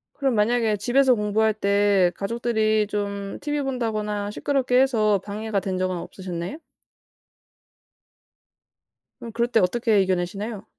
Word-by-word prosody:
그럼 270 -4 0
만약에 220 0 +2
집에서 255 +4 +3
공부할 215 +1 +1
때 200 -3 +2
가족들이 220 0 0
좀 200 -1 -4
티비 295 -1 -2
본다거나 215 -6 -2
시끄럽게 255 +1 +1
해서 215 -6 +2
방해가 215 0 -3
된 190 -1 -3
적은 185 -1 -1
없으셨나요? 180 - -6 2.6
그럼 230 - -8
그럴 235 +1 0
때 235 -2 +2
어떻게 215 +2 +2
이겨내시나요? 190 +3 -2
215 Hz, 300 characters per minute, -24 LUFS, 200-235 Hz, 2.6 s, 집에서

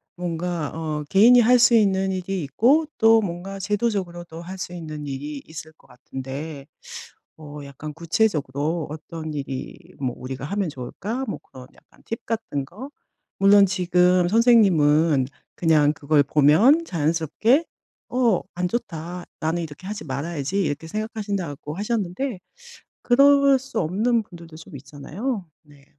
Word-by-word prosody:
뭔가 175 -3 -3
어 155 -2 -3
개인이 235 +6 +7
할 245 +2 +5
수 240 0 +6
있는 195 -3 +2
일이 185 0 -3
있고 250 - +3
또 225 0 +5
뭔가 195 +1 -5
제도적으로도 190 -5 -3
할 185 +3 -8
수 180 -1 -6
있는 155 -3 -7
일이 140 +1 -5
있을 160 0 -10
것 - - -26
같은데 135 +3 -8 0.7
'어 150 -1 -10
약간 140 +2 -8
구체적으로 160 -4 -1
어떤 155 0 -7
일이 135 -2 -5 0.2
뭐 130 -3 -2
우리가 130 +1 -6
하면 200 +2 -2
좋을까?' 200 - -5
뭐 - - -4
그런 130 -1 -13
약간 - - -24
팁 230 +1 -6
같은 180 -11 -3
거 215 - -10 0.5
물론 200 +1 +7
지금 180 -1 +2
선생님은 165 - +4 0.3
그냥 155 -3 +3
그걸 145 0 +2
보면 160 - +4
자연스럽게 170 - +1 0.4
'어 240 -6 +2
안 180 0 -1
좋다. 175 -5 -5 0.2
나는 165 +2 -1
이렇게 160 +3 -10
하지 210 -1 -6
말아야지.' 150 +6 -2
이렇게 150 0 -3
생각하신다고 200 -8 -4
하셨는데 210 +2 -2 0.6
그럴 280 +1 +5
수 260 -4 -4
없는 220 +8 +1
분들도 170 -3 -13
좀 160 -2 -11
있잖아요. 180 - -5 0.2
네. 145 -2 -20
175 Hz, 290 characters per minute, -23 LUFS, 150-210 Hz, 0.7 s, 개인이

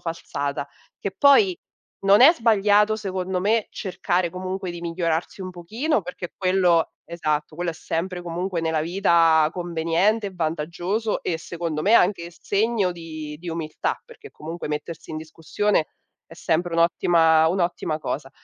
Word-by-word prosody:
falsata. 145 -4 -4 0.3
Che 200 - -3
poi 345 - +5 0.5
non 200 +1 +6
è 305 +6 +9
sbagliato 210 - +3
secondo 185 -3 -3
me 215 +3 +1
cercare 180 -2 -1
comunque 185 +1 -4
di 175 0 -7
migliorarsi 170 +1 -2
un 185 - -5
pochino, 215 - -2
perché 180 0 -7
quello 185 -3 +2 0.2
esatto, 155 -2 -2
quello 175 0 -1
è 160 - -8
sempre 180 +3 -3
comunque 175 +1 -3
nella 160 -1 0
vita 165 -3 +3
conveniente 175 +5 0
e - - -13
vantaggioso 175 +6 -2
e 165 - -2
secondo 165 -1 -4
me 210 +6 +4
anche 180 -4 +3
s 170 - -21
segno 205 -2 +1
di 155 -3 -8
di 175 +2 -8
umiltà, 160 -2 -3
perché 440 -3 -14
comunque 165 +1 -7
mettersi 160 +2 -5
in 155 - -4
discussione 160 +3 -1 0.4
è 165 - -13
sempre 170 +1 -1
un'ottima 165 -1 +4
un'ottima 175 -3 -1
cosa. 140 -3 -4
175 Hz, 145 wpm, -23 LUFS, 165-195 Hz, 0.5 s, è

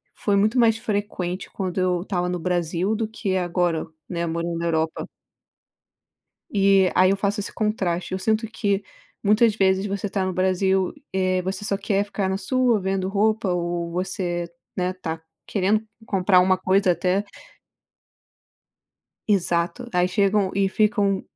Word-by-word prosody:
foi 205 -2 0
muito 215 +5 +2
mais 225 -2 +4
frequente 205 -5 -3
quando 185 -1 -3
eu 180 -1 +1
estava 180 -2 -2
no 180 -1 -2
Brasil 175 +4 0
do 225 0 -1
que 200 -3 -3
agora, 175 -2 0 0.2
né, 170 -2 -2
morando 170 0 -2
na 170 - -3
Europa. 160 -1 -1 1.5
E 195 -2 +4
aí 185 +1 +5
eu 195 - +2
faço 200 +1 -1
esse 200 - -5
contraste. 190 -6 -1
Eu 185 - -1
sinto 220 +3 0
que 205 -2 -1 0.4
muitas 215 +1 +4
vezes 190 -1 +2
você 200 0 -3
tá 195 -1 -1
no 185 - -1
Brasil, 190 0 +1 0.2
eh, 185 -1 +1
você 190 +2 -4
só 200 -1 0
quer 200 0 0
ficar 200 -1 -2
na 190 0 -1
sua 245 +2 +2
vendo 190 0 -1
roupa 215 +1 +1
ou 175 -1 -2
você, 175 -2 -2 0.3
né, 180 0 0
tá 165 -3 -5 0.3
querendo 210 +2 +1 0.2
comprar 185 -1 +4
uma 185 +1 +3
coisa 185 0 +3
até 180 +4 0 2.1
Exato. 180 +4 +1
Aí 180 0 +2
chegam 200 0 +2
e 195 -1 +1
ficam, 205 -2 +2
190 Hz, 150 wpm, -23 LUFS, 180-205 Hz, 2.1 s, aí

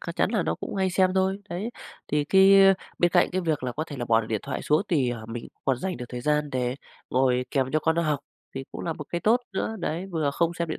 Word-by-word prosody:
c - - -6
chắn - - +2
là - - +1
nó - - -1
cũng - - -7
hay 190 -1 +1
xem 185 +1 +3
thôi, 190 +1 +1
đấy. 195 +7 -4 0.4
Thì 150 -1 +1
cái 190 +4 +6 0.5
bên 175 -1 +3
cạnh - - +3
cái 185 +1 -1
việc 160 -6 -1
là 125 - -2
có 155 +5 -3
thể 145 -4 -8
là 120 - -3
bỏ 115 -1 +3
được 110 - -7
điện 110 -2 -2
thoại - - -4
xuống, 150 +5 +2
thì, 135 -8 +2
ờ, 110 -2 -6
mình 115 0 -6 0.2
còn 135 -2 +2
dành 190 -1 -3
được 125 - -6
thời 125 -1 -5
gian 150 +2 0
để 125 -1 -1 0.4
ngồi 125 -1 +2
kèm 130 -2 0
cho 155 - +3
con 160 +1 +1
nó 170 - +2
học 150 -3 0 0.4
thì 135 - -5
cũng - - -6
là 165 - -1
một 150 - -8
cái 175 - -3
tốt 235 +3 +3
nữa. 220 +3 -2
Đấy, 175 +2 -3
vừa 155 -4 0
không 170 +3 0
xem 170 -1 -3
điện 155 - -3
155 Hz, 285 wpm, -26 LUFS, 130-180 Hz, 0.5 s, cái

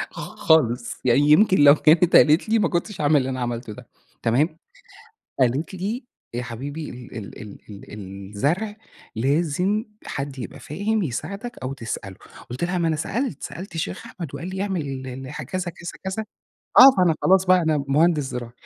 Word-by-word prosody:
خ - - -9 0.2
خالص 125 -7 +2
يعني 125 +1 +4
يمكن 190 +5 +5
لو 140 - +9
كانت 160 +3 +4
قالت 155 +7 +5
لي 225 +1 +3
ما 210 - +2
كنتش 175 +2 -3
هاعمل 150 0 +4
اللي 135 -2 +1
أنا 130 -1 -4
عملته 120 -2 -4
ده - - -12 0.3
تمام. 150 +8 +1 0.8
قالت 130 +8 +1
لي 210 +8 -4 0.3
يا 120 +1 -3
حبيبي 140 +6 -6
ال 125 -1 -10
ال 105 -3 -8
ال 105 -2 -10
ال 100 -1 -10 0.4
الزرع 170 - -1 0.4
لازم 165 - 0 0.2
حد 140 -1 -5
يبقى 120 - -7
فاهم 205 +7 -1
يساعدك 200 - -5
أو 130 +1 -3
تسأله، 115 -6 -6 0.3
قلت 125 +6 -5
لها 180 +1 0
ما 170 -1 +1
أنا 160 - +1
سألت 195 - -3
سألت 175 +3 -7
الشيخ 90 - -4
أحمد 170 -7 -8
وقال 170 - -6
لي 190 0 -4
اعمل 195 -4 -1 0.3
ال 130 +1 -7
كذا، - - -6 0.3
كذا، 170 0 -8
كذا، 190 +3 -3 0.5
آه 270 - +11
فأنا 175 -4 +4
خلاص 190 0 +4
بقى 185 -1 +5
أنا 155 -3 +1
مهندس 150 +2 +3
زراعي، 125 -3 -6
155 Hz, 175 wpm, -23 LUFS, 130-185 Hz, 0.8 s, آه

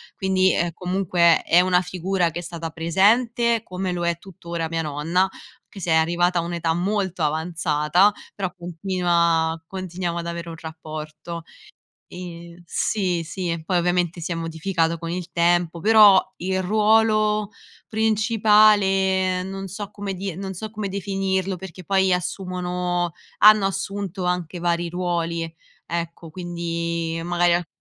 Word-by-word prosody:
Quindi 190 -1 +2
è 170 0 0
comunque, 180 -2 +2
è 175 - +5
una 180 0 +3
figura 180 -1 -1
che 170 +2 -5
è - - -5
stata 165 -1 -5
presente 225 - +2
come 185 0 -4
lo 175 -1 -2
è 170 -1 0
tuttora 170 -3 -5
mia 165 -1 -1
nonna, 155 +5 0
anche 190 +1 -6
se 175 - -4
è - - +5
arrivata 175 +2 +2
a - - +1
un'età 170 -1 -1
molto 185 -2 -1
avanzata, 160 +3 +2 0.2
però 190 -3 -3
continua 170 -2 0
continuiamo 180 -2 -4
ad 170 - -5
avere 170 0 -5
un 165 - -7
rapporto. 160 +1 -7 0.7
Ehm, 170 -1 -9
sì, 180 -1 -1
sì, 170 -1 -4
poi 180 - +1
ovviamente 175 -1 0
si 170 - -3
è - - -1
modificato 165 +1 -1
con 165 +1 -6
il 180 0 -4
tempo, 170 -1 +1
però 210 -1 +7 0.2
il 190 +1 -1
ruolo 215 +1 +3 0.4
principale, 210 -4 +3
non 195 +1 -6
so 200 +2 -6
come 200 -1 -5
dir 190 -1 -5
non 190 -1 -5
so 215 +4 -6
come 210 -2 -4
definirlo, 195 -1 -1
perché 185 0 -10
poi 190 -1 +3
assumono 180 -1 -2 0.3
hanno 210 -2 +7
assunto 195 -1 -3
anche 180 -1 -2
vari 170 0 0
ruoli 170 -1 -2
e 165 0 -6 0.3
ecco, 170 -1 -5
quindi 170 -1 -3
magari 175 0 +2
a 175 -1 0
180 Hz, 145 wpm, -23 LUFS, 170-195 Hz, 0.7 s, però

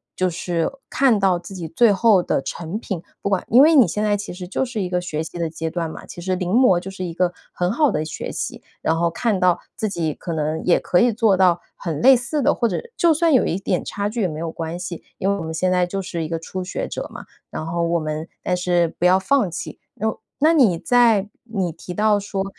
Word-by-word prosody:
就 185 0 +1
是 170 -1 -1 0.2
看 255 -6 +3
到 190 -3 +3
自 175 +3 -10
己 175 -4 -5
最 210 +7 +4
后 200 -3 +4
的 - - 0
成 170 +8 -5
品。 190 -7 -5 0.2
不 - - -1
管 195 -2 0
因 245 +5 +7
为 320 +2 +6
你 255 -10 +7
现 210 +5 -2
在 205 -1 +2
其 205 -1 -6
实 180 0 -8
就 235 - -1
是 240 -4 -4
一 185 - -2
个 180 0 0
学 160 -3 -3
习 175 - -8
的 170 -1 -1
阶 160 0 -4
段 165 0 -3
嘛， - - -9
其 175 - -9
实 185 +1 -1
临 180 -1 -3
摹 230 -6 +5
就 185 - -8
是 190 -1 -6
一 170 - -5
个 180 +1 0 0.2
很 180 +1 0
好 290 +4 +3
的 155 - -1
学 155 - -5
习。 - - -5 0.2
然 165 +1 +1
后 170 - +2
看 215 +1 0
到 180 -1 +3 0.2
自 220 - -2
己 165 -5 -2
可 170 - -5
能 155 0 -2
也 175 - +4
可 175 - +2
以 240 0 +4
做 220 -3 +3
到 180 -2 +3
很 160 -5 -4
类 265 +1 +8
似 270 +5 -2
的， 280 +2 +3
或 235 - +1
者 195 - -2 0.2
就 335 -2 +4
算 325 +1 +2
有 255 - +4
一 175 - -1
点 - - -1
差 205 0 -2
距 230 +2 -3
也 190 - +2
没 155 -2 -6
有 165 0 -3
关 165 +1 -5
系， 180 -2 -6
因 195 - 0
为 200 - +2
我 - - -5
们 160 0 -5
现 185 +3 0
在 180 -1 +3
就 195 +2 -3
是 175 -3 -4
一 - - -3
个 165 +1 -2
初 185 +3 -5
学 180 - -4
者 - - -5
嘛。 - - -9 0.2
然 155 - -5
后 170 +1 -2
我 170 0 +1
们 155 +1 -4 0.2
但 180 - 0
是 175 -1 +1
不 175 - +1
要 180 +1 +6
放 195 +1 +2
弃， 170 - -7 0.2
然 220 - -2
后 - - -7 0.2
那 310 +3 +5
你 235 - +4
在 225 0 +3 0.2
你 195 -7 -2
提 170 +2 -9
到 210 0 +3
说， 195 -1 -3
185 Hz, 285 characters per minute, -21 LUFS, 170-215 Hz, 0.2 s, 类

